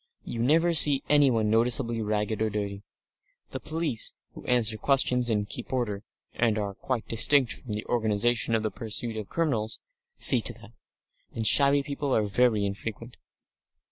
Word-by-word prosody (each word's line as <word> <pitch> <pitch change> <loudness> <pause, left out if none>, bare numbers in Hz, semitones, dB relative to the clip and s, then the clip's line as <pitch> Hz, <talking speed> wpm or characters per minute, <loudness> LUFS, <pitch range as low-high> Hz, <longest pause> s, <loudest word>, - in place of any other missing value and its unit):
You 115 - -5
never 165 +7 +2
see 145 -3 +6
anyone 130 -8 +2
noticeably 115 0 +1
ragged 105 0 -2
or 110 - 0
dirty; 100 -1 -5 0.7
the 130 - -5
police, 155 -6 -2 0.2
who - - -12
answer 115 -3 +2
questions 125 0 +2
and 105 -2 -1
keep - - -8
order 115 -6 -3 0.3
(and 115 -2 0
are 100 -2 -4
quite 125 +3 -5
distinct 130 +3 +3
from 120 -5 -9
the 105 +1 -5
organisation 115 0 0
for - - +1
the 110 -1 -3
pursuit 115 0 -5
of 110 -2 -7
criminals) 125 -10 -2 0.4
see 125 -4 +7
to 120 - -1
that; 115 -1 -16 0.6
and 115 - -4
shabby 140 +3 +4
people 140 -1 -3
are 110 - +1
very 105 0 +1
infrequent. 110 +4 -7
115 Hz, 160 wpm, -26 LUFS, 110-130 Hz, 0.7 s, see